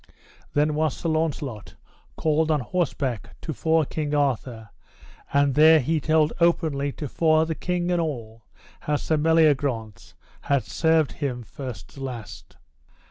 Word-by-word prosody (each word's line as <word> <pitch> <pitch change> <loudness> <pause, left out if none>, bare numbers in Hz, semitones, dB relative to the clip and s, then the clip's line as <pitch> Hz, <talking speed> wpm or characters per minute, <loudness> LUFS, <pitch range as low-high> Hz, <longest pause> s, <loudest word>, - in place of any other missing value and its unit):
Then 150 +1 +2
was 155 -2 0
Sir 165 - -2
Launcelot 150 -9 -2 0.4
called 155 0 +1
on 155 -2 +2
horseback 135 - -2
to 160 - -4
fore 160 +1 +2
King 150 0 -3
Arthur, 125 -6 -1 0.6
and 140 -1 +3
there 155 +2 +7
he 155 +4 0
told 155 0 +2
openly 155 -5 +1
to 150 - -5
fore 160 +3 +2
the 160 - -2
king 180 +1 -2
and 175 -1 +2
all, 115 -8 -5 0.4
how 150 - -1
Sir 155 +2 0
Meliagrance 145 -8 +1 0.3
had 140 -2 +1
served 160 -3 +1
him 125 -4 -4
first 125 +1 -8
to 135 - -10
last. 120 -5 -8
150 Hz, 140 wpm, -24 LUFS, 135-160 Hz, 0.6 s, there